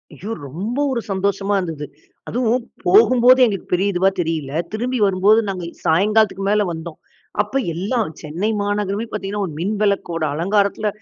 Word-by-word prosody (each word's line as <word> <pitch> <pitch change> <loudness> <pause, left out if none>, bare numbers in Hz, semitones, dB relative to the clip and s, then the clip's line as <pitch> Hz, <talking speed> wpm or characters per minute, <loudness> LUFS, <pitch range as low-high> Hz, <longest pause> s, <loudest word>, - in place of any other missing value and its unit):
ஐயோ! 210 +4 -7 0.2
ரொம்ப 200 - -4
ஒரு 240 -3 -1
சந்தோஷமா 195 +1 0
இருந்தது. 160 -5 -4 0.4
அதுவும் 245 0 0 0.2
போகும்போதே 255 - +6
எங்களுக்கு 200 -5 -3
பெரிய 195 +3 +2
இதுவா 190 +2 +3
தெரியில்ல. 160 -5 -2 0.2
திரும்பி 245 +3 -1
வரும்போது 195 +3 +4
நாங்க 185 -2 -4 0.2
சாயங்காலத்திற்கு 195 +3 +2
மேல 210 0 +3
வந்தோம். 160 0 -7 0.4
அப்ப 210 +5 -7 0.2
எல்லாம் 205 +3 -1
சென்னை 170 +8 -2
மாநகரமே 205 +1 -1
பார்த்தீங்கனா, 205 0 -3
ஒரு 155 - -8
மின் 200 +5 -1
விளக்கோட 185 -5 0
அலங்காரத்தில, 200 +5 +1
200 Hz, 140 wpm, -20 LUFS, 180-220 Hz, 0.4 s, போகும்போதே